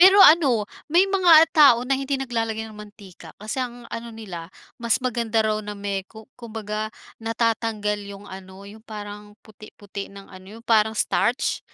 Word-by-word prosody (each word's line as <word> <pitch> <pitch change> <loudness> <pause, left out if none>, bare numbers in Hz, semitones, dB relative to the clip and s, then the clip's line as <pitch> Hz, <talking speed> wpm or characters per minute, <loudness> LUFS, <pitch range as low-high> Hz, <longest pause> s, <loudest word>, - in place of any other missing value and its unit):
Pero 380 +2 +8
ano, 275 - +5 0.3
may 360 +3 +6
mga 355 -5 +7
tao 285 -7 +7
na 270 - -1
hindi 275 +1 -2
naglalagay 225 -3 -2
ng 215 - -13
mantika, 205 -5 -13
kasi 215 +4 -5
ang 245 -1 -5
ano 235 +1 -5
nila, 180 -7 -8 0.3
mas 235 -1 +2
maganda 230 -2 0
raw 215 0 +1
na 210 - -5
may, 200 -1 -3
ku 220 0 -13 0.2
kumbaga 215 -2 -5 0.3
natatanggal 225 -2 -1
'yung 200 0 -10
ano, 190 +1 -11
'yung 215 +2 -13
parang 210 -1 -9
puti-puti 205 -2 -10
ng 200 0 -12
ano, 185 0 -13
'yung 230 - -15
parang 220 -2 +3
starch. 245 +3 0
220 Hz, 165 wpm, -23 LUFS, 205-235 Hz, 0.3 s, Pero